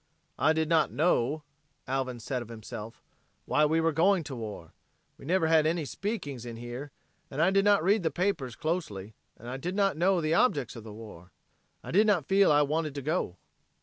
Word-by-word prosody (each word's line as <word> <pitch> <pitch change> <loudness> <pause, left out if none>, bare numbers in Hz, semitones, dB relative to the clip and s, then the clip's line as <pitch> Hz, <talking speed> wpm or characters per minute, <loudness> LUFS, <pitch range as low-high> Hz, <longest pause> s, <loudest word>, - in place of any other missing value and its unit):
"I 155 - +4
did 160 0 0
not 160 -1 +3
know," 150 -2 +1 0.4
Alvin 130 -2 -2
said 125 +2 -3
of 120 - -8
himself, 110 0 -9 0.4
"why 150 - +3
we 160 +2 +2
were 165 0 +2
going 175 +3 +3
to 135 - -7
war. 105 -8 -7 0.4
We - - -14
never 180 0 +2
had 160 -1 +4
any 165 -1 0
speakings 145 - -4
in 120 -1 -7
here, 120 +5 -7 0.4
and 135 - -6
I 170 +4 +4
did 195 +1 +3
not 205 -4 +4
read 200 +4 +3
the 165 - +1
papers 155 - -1
closely, 110 - -3 0.2
and 125 +3 -7
did 180 +5 -3
not 195 -4 +2
know 185 +2 +3
the 155 -1 0
objects 145 - +2
of 115 - -9
the 110 - -9
war. 105 -5 -11 0.5
I - - -7
did 210 +5 +4
not 185 -9 +2
feel 195 -1 +4
I 145 0 +5
wanted 155 0 -1
to 140 - -5
go." 150 - -1
155 Hz, 200 wpm, -29 LUFS, 125-175 Hz, 0.5 s, I